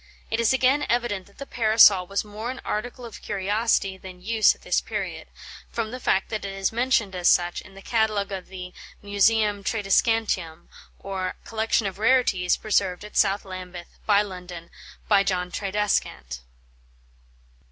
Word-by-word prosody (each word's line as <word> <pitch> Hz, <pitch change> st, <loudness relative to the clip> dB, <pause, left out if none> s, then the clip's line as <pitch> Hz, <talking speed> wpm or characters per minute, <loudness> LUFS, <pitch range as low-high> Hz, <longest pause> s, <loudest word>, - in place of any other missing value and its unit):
It 225 Hz, -, 0 dB
is 230 Hz, +1 st, +3 dB
again 265 Hz, +3 st, +3 dB
evident 230 Hz, -6 st, -1 dB
that 200 Hz, -, -23 dB
the 275 Hz, -, -7 dB
Parasol 215 Hz, -6 st, +5 dB
was 200 Hz, +2 st, -2 dB
more 210 Hz, +3 st, -6 dB
an 260 Hz, -, -5 dB
article 245 Hz, +3 st, -4 dB
of 230 Hz, -, -10 dB
curiosity 200 Hz, 0 st, 0 dB
than 185 Hz, -1 st, -11 dB
use 220 Hz, +3 st, +3 dB
at -, -, -24 dB
this -, -, +1 dB
period, -, -, -5 dB, 0.4 s
from 225 Hz, -2 st, -3 dB
the 255 Hz, -, -6 dB
fact 195 Hz, -5 st, +1 dB
that 215 Hz, -2 st, -4 dB
it 195 Hz, -1 st, -5 dB
is 195 Hz, 0 st, -1 dB
mentioned 230 Hz, -4 st, +1 dB
as 180 Hz, -1 st, 0 dB
such 175 Hz, 0 st, +2 dB
in 195 Hz, -, -16 dB
the 195 Hz, -, -12 dB
catalogue 215 Hz, -4 st, 0 dB
of 190 Hz, -2 st, -5 dB
the 180 Hz, -1 st, -8 dB, 0.3 s
"Museum 205 Hz, 0 st, +2 dB
Tradescantium, 195 Hz, -5 st, 0 dB, 0.3 s
or 190 Hz, -2 st, -4 dB
Collection 225 Hz, 0 st, 0 dB
of 195 Hz, 0 st, -4 dB
Rarities, 220 Hz, -7 st, +3 dB
preserved 200 Hz, -3 st, 0 dB
at 210 Hz, -, -12 dB
South 200 Hz, 0 st, +2 dB
Lambeth, 185 Hz, -2 st, -9 dB
by 205 Hz, -1 st, +5 dB
London, 180 Hz, -3 st, -9 dB, 0.4 s
by 200 Hz, -2 st, +5 dB
John 180 Hz, -2 st, -1 dB
Tradescant." 190 Hz, -, -2 dB
200 Hz, 160 wpm, -25 LUFS, 185-225 Hz, 0.4 s, Parasol